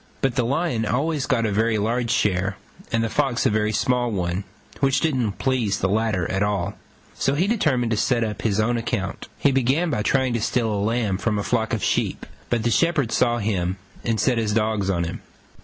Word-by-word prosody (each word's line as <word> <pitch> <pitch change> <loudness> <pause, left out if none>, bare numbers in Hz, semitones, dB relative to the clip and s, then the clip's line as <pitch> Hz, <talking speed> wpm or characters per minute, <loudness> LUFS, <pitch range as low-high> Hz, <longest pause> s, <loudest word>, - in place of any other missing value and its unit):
But 135 -2 +1
the 125 0 +1
Lion 140 -1 0
always 140 +6 0
got 120 -5 +1
a 110 - 0
very 110 +2 +2
large 115 +3 0
share, 95 -2 +1 0.3
and 115 0 +1
the - - +1
Fox 135 -1 0
a - - +4
very 105 0 +1
small 120 +2 +1
one, 90 -2 -2 0.3
which 135 0 +3
didn't 130 -10 0
please 120 -5 0
the 95 - 0
latter 105 -3 0
at 95 - -1
all; 100 -3 0 0.4
so 135 - 0
he 170 +6 +2
determined 145 - +1
to 110 - +1
set 120 +1 +2
up 105 -3 -3
on - - +2
his 100 -1 0
own 120 +2 +2
account. 100 -4 -3
He 140 - +3
began 135 +6 +1
by 105 - 0
trying 130 +2 +1
to 115 - -1
steal 115 -1 0
a 100 - -1
lamb 105 -3 0
from 105 0 0
a 100 - -1
flock 110 -1 0
of 115 - -1
sheep: - - 0 0.2
but 120 -2 0
the 120 - +1
shepherd 150 -5 +2
saw 120 -1 +2
him 95 -4 -1 0.3
and 115 -2 0
set 125 -3 +2
his 110 -2 0
dogs 110 -3 0
on 85 -3 +1
him. 85 +1 -5
115 Hz, 220 wpm, -23 LUFS, 105-125 Hz, 0.4 s, a